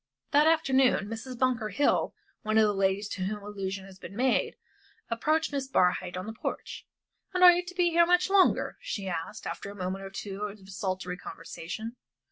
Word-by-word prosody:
That 295 +2 +5
afternoon 265 -9 +3
Mrs. 230 +3 -6
Bunker 245 -4 +1
Hill 255 +9 +1 0.3
one 215 0 0
of 220 - +7
the 210 -1 +3
ladies 195 +1 +1
to 190 - -5
whom 210 +1 -4
allusion 195 -2 -5
has 190 -1 -14
been 200 - -9
made 255 +3 +1 0.6
approached 310 +8 +1
Miss 275 -2 -2
Barhyte 180 -6 +1
on 185 - -4
the 220 - -5
porch. - - -5 0.5
"And 365 - +3
are 360 - +12
you 350 +1 +1
to 365 0 -10
be 350 -1 +3
here 340 0 +5
much 360 0 +4
longer?" 390 -1 +3
she 195 -2 -4
asked, 175 +4 -4
after - - -5
a 200 - -9
moment 190 0 -4
or 195 - -6
two 195 0 -6
of 210 0 -4
desultory 185 -2 -4
conversation. 190 +8 -7
215 Hz, 190 wpm, -29 LUFS, 195-270 Hz, 0.6 s, are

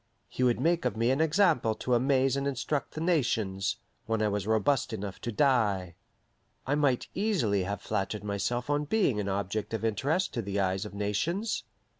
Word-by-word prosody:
He - - -6
would 125 -2 +3
make 165 +4 +2
of - - -1
me 115 +2 +2
an 135 +4 +1
example 160 - +3
to 125 +3 -2
amaze 130 +2 +3
and 140 0 -1
instruct 140 +2 -2
the 155 - -4
nations 115 - +1 0.3
when 110 -1 0
I 105 - +2
was 100 -1 -2
robust 110 +4 +1
enough 100 -3 -5
to 120 - -3
die. 105 - +2 0.7
I 135 - 0
might 145 -4 +1
easily 125 - +1
have 100 0 -4
flattered 100 +1 -2
myself 105 +4 -2
on 145 0 0
being 145 - +1
an 100 -1 -2
object 100 +3 -2
of 115 - -3
interest 140 - 0
to 120 - -1
the 100 -1 -2
eyes 95 0 0
of 105 - -8
nations. 135 - -1
120 Hz, 185 wpm, -29 LUFS, 100-145 Hz, 0.7 s, would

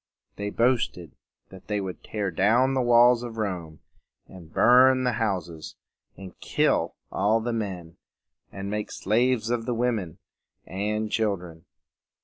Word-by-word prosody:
They 100 0 -4
boasted 115 - 0 0.4
that 95 0 -14
they 105 -1 -1
would 95 -2 -6
tear 105 -3 -3
down 115 +10 +2
the 130 - +1
walls 120 0 +5
of 120 -2 -7
Rome, 90 -7 -4 0.4
and 85 -4 -14
burn 130 +4 +5
the 125 - +1
houses, 90 -7 -3 0.4
and 95 0 -10
kill - - 0 0.2
all 105 +4 +2
the 120 +1 -3
men, 95 -7 -5 0.5
and 100 0 -6
make 105 0 -3
slaves 115 +2 0
of 120 -1 -2
the 120 - -1
women 115 -9 -2 0.5
and 105 +4 -3
children. 90 -6 -2
105 Hz, 135 wpm, -25 LUFS, 95-120 Hz, 0.5 s, walls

